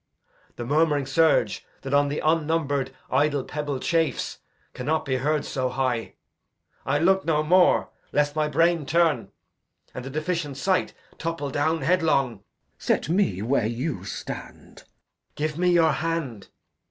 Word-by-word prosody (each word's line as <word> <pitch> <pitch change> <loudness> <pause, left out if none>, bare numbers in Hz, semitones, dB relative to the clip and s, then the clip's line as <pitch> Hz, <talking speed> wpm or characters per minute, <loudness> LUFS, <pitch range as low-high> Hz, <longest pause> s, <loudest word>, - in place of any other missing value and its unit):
The 120 - -5
murmuring 145 +1 +2
surge 135 -6 +2 0.2
That 135 +1 -4
on 145 0 +4
th' 145 - -2
unnumb'red 155 -4 +1 0.2
idle 145 -1 +2
pebble 145 -2 -4
chafes 165 -3 -1 0.3
Cannot 150 +5 -1
be 130 -1 0
heard 150 +3 0
so 130 -1 -1
high. 125 -3 -2 0.7
I'll 145 +2 +1
look 190 +2 +4
no 155 -2 +1
more, 180 +3 +4 0.2
Lest 145 0 +1
my 155 -1 +1
brain 165 0 +2
turn, 165 +1 +2 0.6
and 125 - -6
the 135 - -6
deficient 155 -1 -3
sight 185 +5 0 0.2
Topple 165 -4 -3
down 160 +4 0
headlong. 155 - +2
Glou. - - -27 0.4
Set - - 0
me 170 - +1
where 120 -1 +1
you 120 - -3
stand. 100 - -8
Edg. - - -23
Give 155 0 -2
me 180 0 +3
your 165 -2 +4
hand. 155 -11 -3
150 Hz, 145 wpm, -25 LUFS, 135-165 Hz, 0.7 s, on